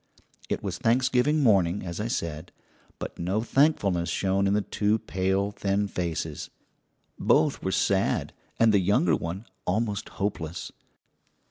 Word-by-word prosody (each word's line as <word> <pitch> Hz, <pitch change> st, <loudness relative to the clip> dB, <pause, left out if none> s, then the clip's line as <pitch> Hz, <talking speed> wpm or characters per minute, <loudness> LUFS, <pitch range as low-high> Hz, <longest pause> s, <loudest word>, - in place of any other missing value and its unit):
It -, -, -2 dB
was -, -, -4 dB
Thanksgiving 130 Hz, +5 st, +2 dB
morning, 95 Hz, -7 st, +3 dB
as 85 Hz, +1 st, -5 dB
I 105 Hz, -, -1 dB
said, 80 Hz, -9 st, -4 dB, 0.5 s
but -, -, -7 dB
no 95 Hz, +5 st, 0 dB
thankfulness 105 Hz, -, +2 dB
shone 95 Hz, 0 st, +1 dB
in 100 Hz, -, +2 dB
the 105 Hz, -, +1 dB
two 105 Hz, +2 st, +1 dB
pale, 95 Hz, 0 st, -1 dB
thin 100 Hz, 0 st, 0 dB
faces. 85 Hz, -4 st, -4 dB, 0.7 s
Both -, -, +3 dB
were -, -, -1 dB
sad, -, -, +1 dB, 0.3 s
and 115 Hz, -1 st, +5 dB
the 100 Hz, -, +5 dB
younger 90 Hz, -3 st, +3 dB
one 90 Hz, +7 st, -5 dB, 0.2 s
almost 105 Hz, +2 st, -1 dB
hopeless. 85 Hz, -5 st, -3 dB
100 Hz, 135 wpm, -27 LUFS, 90-110 Hz, 0.7 s, and